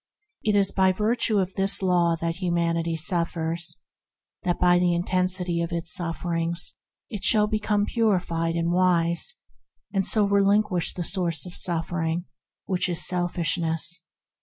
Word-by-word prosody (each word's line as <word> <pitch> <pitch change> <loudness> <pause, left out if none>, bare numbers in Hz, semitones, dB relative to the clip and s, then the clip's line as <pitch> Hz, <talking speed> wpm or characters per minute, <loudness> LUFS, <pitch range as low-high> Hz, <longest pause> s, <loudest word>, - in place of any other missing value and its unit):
It 210 -1 +1
is 200 -1 +3
by 190 -1 +3
virtue 215 +2 +1
of 190 -1 0
this 195 0 -1
Law 175 -2 +2
that 165 0 -2
Humanity 170 -2 -1
suffers, 165 0 -1 0.6
in - - -9
order 175 - +1
that - - -29
by 175 0 +4
the 175 -1 +2
intensity 180 -1 0
of 170 - -3
its 170 -1 0
sufferings 170 0 -1 0.4
it 210 -3 -6
shall 215 -2 +5
at 210 - 0
last 215 - 0
become 205 -1 +1
purified 180 -8 0
and 170 0 0
wise, 175 - +1 0.6
and 195 -1 +1
so 210 +2 +2
relinquish 200 -2 +2
the 175 - -3
source 175 -2 0
of 180 - -9
suffering, 170 0 -1 0.4
which 185 -1 0
is 175 - 0
selfishness. 170 -1 -1
175 Hz, 155 wpm, -25 LUFS, 170-190 Hz, 0.6 s, shall